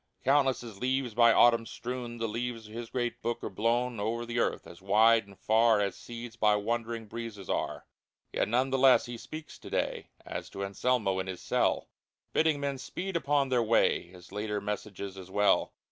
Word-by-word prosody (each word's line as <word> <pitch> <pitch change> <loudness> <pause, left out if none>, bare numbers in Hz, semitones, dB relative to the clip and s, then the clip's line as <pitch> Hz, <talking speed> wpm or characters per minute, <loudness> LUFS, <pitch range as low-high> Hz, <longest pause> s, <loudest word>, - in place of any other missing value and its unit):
Countless 135 -2 +3
as 110 -5 -10
leaves 130 -2 0
by 115 +1 +6
autumn 115 -1 +5
strewn 120 -1 -5
The 115 0 -1
leaves 115 0 -4
of 105 - -13
His 115 0 -6
great 120 -1 -2
Book 120 +1 -2
are - - -4
blown 115 +3 0
Over 115 +3 -2
the 120 +1 -2
earth - - 0
as 85 - -13
wide 110 +3 +4
and 100 -1 -15
far 110 0 +4
As 100 -1 0
seeds 120 0 -8
by 105 -1 +3
wandering 115 +2 -2
breezes 110 -3 -6
are! - - -2 0.5
Yet - - +1
none 125 +4 +1
the 135 - +1
less 130 -1 +6
He 120 -1 -6
speaks 150 +7 -9
to - - -10
day - - -2 0.2
As - - -6
to 100 - -4
Anselmo 100 -1 0
in 95 - -3
his 95 -1 -5
cell; - - +1 0.5
Bidding 155 -2 +3
men 140 -1 -2
speed 185 +7 -5
upon 145 -4 +1
their 125 -2 +3
way 115 0 +3
His 90 0 -15
later 105 +1 -2
messages 100 -1 -5
as 95 -1 -10
well. 105 +2 +3
115 Hz, 195 wpm, -30 LUFS, 105-125 Hz, 0.5 s, by